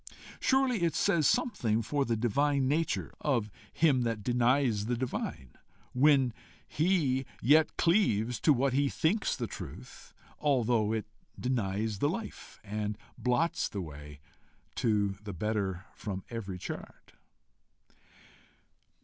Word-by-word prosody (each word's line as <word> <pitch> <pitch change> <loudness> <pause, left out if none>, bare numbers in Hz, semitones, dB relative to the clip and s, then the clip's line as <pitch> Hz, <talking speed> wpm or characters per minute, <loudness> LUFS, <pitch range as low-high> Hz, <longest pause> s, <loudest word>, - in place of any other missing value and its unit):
Surely 260 -6 +2
it 170 -2 +1
says 160 -3 +3
something 120 - +1
for 145 +2 0
the 115 - 0
divine 135 +4 +1
nature 160 +4 0
of 120 -8 0 0.2
him 145 -6 +3
that 115 -3 -2
denies 120 -2 +2
the 120 0 0
divine, 80 - -4 0.4
when 135 -2 +4 0.3
he 150 -6 +1 0.2
yet 155 +5 +4
cleaves 125 - +2
to 155 - +4
what 135 -1 +2
he 140 +1 +2
thinks 195 +11 +1
the - - -3
truth, 65 - -9 0.3
although 120 -7 +2
it 110 -1 -1 0.3
denies 110 -4 -1
the 145 - +2
life, 220 +7 -6
and 105 0 -3 0.2
blots 125 +7 0
the 100 - -5
way 75 -4 -8 0.5
to 105 -3 +1
the 105 -2 -6
better 95 -1 -2
from 95 -3 -5
every 100 -5 -5
chart! - - -8
120 Hz, 125 wpm, -30 LUFS, 105-145 Hz, 0.5 s, when